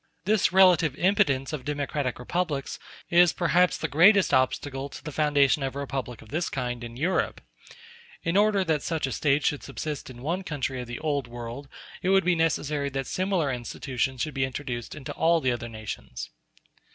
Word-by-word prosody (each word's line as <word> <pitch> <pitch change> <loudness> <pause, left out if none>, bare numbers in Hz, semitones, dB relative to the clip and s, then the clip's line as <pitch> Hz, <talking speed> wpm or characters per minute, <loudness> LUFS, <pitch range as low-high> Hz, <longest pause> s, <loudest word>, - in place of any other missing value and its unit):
This 210 -1 +3
relative 180 -6 +5
impotence 145 -7 +2
of 145 -4 -4
democratic 145 -2 -2
republics 145 +1 -2 0.3
is, 175 0 +6
perhaps, 180 +1 +2
the 160 - -2
greatest 180 +6 +5
obstacle 135 +1 0
to - - -10
the 155 - -6
foundation 145 -1 +3
of 135 0 -3
a - - -3
republic 130 -4 -5
of 110 - -17
this 160 +4 -1
kind 125 -3 -3
in 120 0 -8
Europe. 175 +7 0 0.8
In 165 - -1
order 205 -1 +4
that 160 -4 0
such 165 -2 -1
a 135 - -4
State 145 +1 +1
should 145 - +1
subsist 145 +1 -5
in 125 -1 -11
one 170 +6 -1
country 135 -5 -3
of 125 - -7
the 120 - -5
Old 145 -5 -1
World, 120 +3 -7 0.3
it 185 - 0
would 195 -1 +4
be 180 - +4
necessary 150 -3 0
that 135 0 -3
similar 185 -5 0
institutions 125 +1 -3
should 155 - -2
be 135 - 0
introduced 130 -2 -4
into 140 -4 -7
all 165 +1 +3
the 130 -4 +1
other 120 -1 -4
nations. 110 - -7
145 Hz, 185 wpm, -26 LUFS, 130-165 Hz, 0.8 s, is